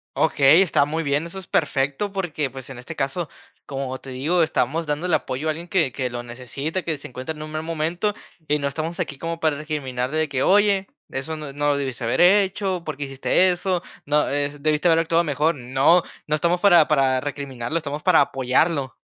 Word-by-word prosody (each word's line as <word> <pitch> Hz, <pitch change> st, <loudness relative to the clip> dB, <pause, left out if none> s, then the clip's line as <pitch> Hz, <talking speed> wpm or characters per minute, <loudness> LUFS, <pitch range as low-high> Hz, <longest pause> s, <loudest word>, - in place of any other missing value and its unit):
Okey, 145 Hz, +6 st, +5 dB
está 155 Hz, -6 st, +3 dB
muy 160 Hz, +3 st, -2 dB
bien, 145 Hz, +2 st, 0 dB
eso 180 Hz, +3 st, -7 dB
es 185 Hz, -, -12 dB
perfecto 145 Hz, +6 st, 0 dB
porque, 155 Hz, -8 st, -2 dB
pues, 130 Hz, -1 st, -10 dB
en 130 Hz, -, -8 dB
este 125 Hz, -, -9 dB
caso, 140 Hz, +4 st, -2 dB, 0.4 s
como 135 Hz, -1 st, -4 dB
te 135 Hz, -, -11 dB
digo, 155 Hz, +7 st, +1 dB
estamos 160 Hz, +1 st, 0 dB
dando 150 Hz, +4 st, -2 dB
el 175 Hz, -, 0 dB
apoyo 135 Hz, +5 st, -1 dB
a 155 Hz, -, +3 dB
alguien 170 Hz, +3 st, -7 dB
que 160 Hz, -10 st, +1 dB
que 130 Hz, -2 st, -2 dB
lo 120 Hz, 0 st, -5 dB
necesita, 130 Hz, +8 st, -5 dB
que 160 Hz, -3 st, -2 dB
se 140 Hz, -, -9 dB
encuentra 130 Hz, +5 st, -5 dB
en 150 Hz, -, -10 dB
un 155 Hz, -, -6 dB
mal 155 Hz, 0 st, -3 dB
momento. 165 Hz, +5 st, -1 dB, 0.4 s
Y 150 Hz, 0 st, +2 dB
no 140 Hz, -, -1 dB
estamos 160 Hz, +4 st, -4 dB
aquí 140 Hz, -, -3 dB
como 165 Hz, +1 st, -4 dB
para 155 Hz, -3 st, +1 dB
recriminar 135 Hz, -4 st, -3 dB
de 155 Hz, 0 st, +1 dB
que: 135 Hz, -2 st, -1 dB
"Oye, 200 Hz, -1 st, +3 dB, 0.2 s
eso 145 Hz, +4 st, -4 dB
no 150 Hz, -3 st, -7 dB
no 145 Hz, +1 st, 0 dB
lo 145 Hz, -, +2 dB
debiste 130 Hz, -4 st, -4 dB
haber 115 Hz, -, 0 dB
hecho, 190 Hz, -1 st, +3 dB
por 155 Hz, -4 st, -5 dB
qué 145 Hz, -, -3 dB
hiciste 135 Hz, +7 st, +2 dB
eso", 180 Hz, 0 st, -1 dB, 0.2 s
¿no? 150 Hz, +1 st, +2 dB
Eh, 145 Hz, 0 st, 0 dB
debiste 155 Hz, +3 st, +2 dB
haber 165 Hz, 0 st, +5 dB
actuado 165 Hz, +1 st, +2 dB
mejor. 150 Hz, +2 st, +1 dB
No 135 Hz, +7 st, +3 dB, 0.2 s
no 155 Hz, -, +1 dB
estamos 170 Hz, +3 st, +1 dB
para 175 Hz, -6 st, +6 dB
para 135 Hz, -3 st, +3 dB
recriminarlo, 140 Hz, 0 st, -4 dB
estamos 150 Hz, -1 st, -4 dB
para 185 Hz, -3 st, +5 dB
apoyarlo. 135 Hz, +1 st, +1 dB
150 Hz, 215 wpm, -23 LUFS, 135-170 Hz, 0.4 s, para